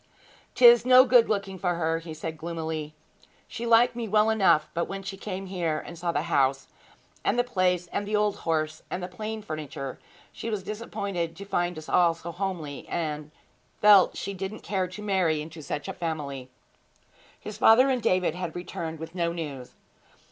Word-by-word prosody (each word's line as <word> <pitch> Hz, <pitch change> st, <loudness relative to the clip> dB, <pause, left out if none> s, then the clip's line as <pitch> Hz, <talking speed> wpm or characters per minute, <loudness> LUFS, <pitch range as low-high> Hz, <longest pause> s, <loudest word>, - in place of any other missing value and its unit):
''Tis 240 Hz, -1 st, +8 dB
no 255 Hz, +1 st, +7 dB
good 245 Hz, -3 st, +5 dB
looking 195 Hz, -3 st, -2 dB
for 180 Hz, -2 st, 0 dB
her,' 165 Hz, -1 st, 0 dB
he 165 Hz, 0 st, -9 dB
said 160 Hz, +1 st, -5 dB
gloomily. 160 Hz, -2 st, -5 dB, 0.5 s
'She 235 Hz, +1 st, -5 dB
liked 235 Hz, +1 st, +5 dB
me 235 Hz, -2 st, -3 dB
well 215 Hz, +1 st, +3 dB
enough, 195 Hz, -8 st, +3 dB
but 170 Hz, 0 st, 0 dB
when 195 Hz, 0 st, -6 dB
she 195 Hz, 0 st, -5 dB
came 195 Hz, -1 st, -6 dB
here 175 Hz, -5 st, -2 dB
and 170 Hz, -, -8 dB
saw 170 Hz, +1 st, -2 dB
the -, -, -1 dB
house, 135 Hz, 0 st, +1 dB, 0.5 s
and 215 Hz, -, +1 dB
the 245 Hz, -, +4 dB
place, 185 Hz, -7 st, +1 dB
and 205 Hz, -, -2 dB
the 210 Hz, -, 0 dB
old 210 Hz, -1 st, +1 dB
horse, 155 Hz, -1 st, -1 dB
and 180 Hz, -, -4 dB
the -, -, -3 dB
plain 215 Hz, +3 st, -6 dB
furniture, 145 Hz, -5 st, -6 dB, 0.3 s
she 230 Hz, -, -6 dB
was 210 Hz, -4 st, -3 dB
disappointed 200 Hz, -5 st, -4 dB
to 200 Hz, -, -9 dB
find 175 Hz, -3 st, -1 dB
us 155 Hz, -, -9 dB
all 170 Hz, -2 st, +3 dB
so 170 Hz, +1 st, -7 dB
homely, 170 Hz, -6 st, -5 dB
and 150 Hz, -3 st, -3 dB, 0.5 s
felt 205 Hz, -3 st, +6 dB
she 200 Hz, -, -4 dB
didn't 195 Hz, +3 st, -6 dB
care 190 Hz, -3 st, -1 dB
to 190 Hz, +4 st, -9 dB
marry 185 Hz, -6 st, +1 dB
into 160 Hz, +1 st, -8 dB
such 145 Hz, +1 st, -5 dB
a -, -, -4 dB
family!' 140 Hz, -6 st, -4 dB, 0.9 s
His -, -, -8 dB
father 245 Hz, +4 st, +7 dB
and 255 Hz, -2 st, 0 dB
David 185 Hz, -7 st, +2 dB
had 175 Hz, -2 st, -5 dB
returned 165 Hz, -2 st, -5 dB
with 160 Hz, +1 st, -8 dB
no 170 Hz, -2 st, 0 dB
news. 145 Hz, -7 st, -6 dB
180 Hz, 185 wpm, -27 LUFS, 160-205 Hz, 0.9 s, Tis